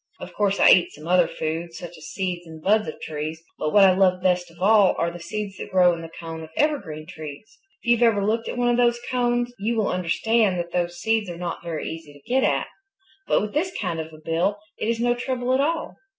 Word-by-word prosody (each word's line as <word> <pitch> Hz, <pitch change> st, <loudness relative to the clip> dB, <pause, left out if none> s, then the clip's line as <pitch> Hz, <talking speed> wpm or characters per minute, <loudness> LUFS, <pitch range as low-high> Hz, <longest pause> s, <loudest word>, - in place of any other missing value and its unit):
Of -, -, -9 dB
course 200 Hz, -1 st, +1 dB
I -, -, +7 dB
eat 175 Hz, -2 st, +4 dB
some 150 Hz, +2 st, -11 dB
other 180 Hz, -1 st, +4 dB
food, 165 Hz, +2 st, -4 dB
such 175 Hz, 0 st, -8 dB
as 160 Hz, 0 st, -11 dB
seeds 180 Hz, -3 st, -3 dB
and 160 Hz, -1 st, -10 dB
buds 210 Hz, +5 st, +2 dB
of 155 Hz, -, -6 dB
trees. 155 Hz, +1 st, -4 dB, 0.2 s
But 155 Hz, -, -1 dB
what 205 Hz, +2 st, +6 dB
I 185 Hz, -, +5 dB
love 185 Hz, -1 st, +3 dB
best 180 Hz, -1 st, +1 dB
of 165 Hz, -, -19 dB
all 200 Hz, 0 st, +5 dB
are 170 Hz, 0 st, 0 dB
the 175 Hz, -, -9 dB
seeds 200 Hz, +3 st, -5 dB
that -, -, -7 dB
grow 180 Hz, -2 st, +5 dB
in 170 Hz, -, -5 dB
the 165 Hz, -, -8 dB
cones 165 Hz, 0 st, -8 dB
of 160 Hz, -, -9 dB
evergreen 195 Hz, -, 0 dB
trees. 155 Hz, +5 st, -10 dB, 0.2 s
If -, -, -12 dB
you've 240 Hz, 0 st, +3 dB
ever 215 Hz, -4 st, +4 dB
looked 225 Hz, +2 st, 0 dB
at -, -, -5 dB
one 245 Hz, 0 st, +2 dB
of 240 Hz, -, +2 dB
those 240 Hz, -1 st, +3 dB
cones, 240 Hz, -1 st, 0 dB
you 225 Hz, +4 st, 0 dB
will 220 Hz, -3 st, +1 dB
understand 190 Hz, +3 st, +1 dB
that 170 Hz, 0 st, -4 dB
those 175 Hz, 0 st, -1 dB
seeds 220 Hz, -1 st, 0 dB
are 170 Hz, -, -6 dB
not 175 Hz, -1 st, -4 dB
very 165 Hz, -2 st, -4 dB
easy 160 Hz, -2 st, -8 dB
to 145 Hz, -1 st, -19 dB
get 260 Hz, +2 st, +2 dB
at. -, -, +2 dB, 0.6 s
But -, -, +3 dB
with 210 Hz, -, -5 dB
this 350 Hz, +5 st, 0 dB
kind 175 Hz, -5 st, -2 dB
of 160 Hz, 0 st, -5 dB
a 155 Hz, -, -12 dB
bill 165 Hz, +6 st, 0 dB, 0.2 s
it 220 Hz, -, -1 dB
is 230 Hz, 0 st, 0 dB
no 240 Hz, +1 st, +2 dB
trouble 250 Hz, 0 st, -2 dB
at 260 Hz, -, +3 dB
all. 325 Hz, +3 st, -1 dB
185 Hz, 250 wpm, -24 LUFS, 165-225 Hz, 0.6 s, I